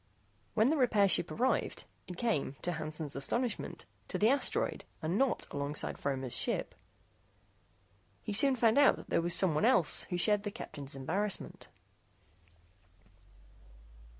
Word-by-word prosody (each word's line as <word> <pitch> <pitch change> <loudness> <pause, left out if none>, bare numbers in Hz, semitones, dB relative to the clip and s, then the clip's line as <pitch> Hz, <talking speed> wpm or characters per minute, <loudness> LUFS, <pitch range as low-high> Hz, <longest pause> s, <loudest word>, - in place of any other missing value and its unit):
When 225 +5 +3
the 320 - +1
repair 225 -6 +3
ship - - +2
arrived, 255 +3 -1 0.2
it 180 - -8
came, 185 - -1
to 175 - 0
Hansen's 155 -2 -5
astonishment, 230 - -2 0.2
to - - -3
the 215 - +3
asteroid, 275 +2 +1 0.2
and 165 +2 -2
not 265 +3 +1
alongside 145 +1 -3
Fromer's 135 -3 -3
ship. - - -2 1.5
He 210 - -4
soon 265 +6 +4
found 230 +1 +3
out 285 - +6
that - - -13
there - - +2
was 170 +1 +2
someone 165 -6 +2
else 215 - +4
who 180 - -4
shared 210 +3 +2
the 205 - -4
Captain's 140 -8 -9
embarrassment. 195 +10 -3
195 Hz, 135 wpm, -32 LUFS, 150-235 Hz, 1.5 s, out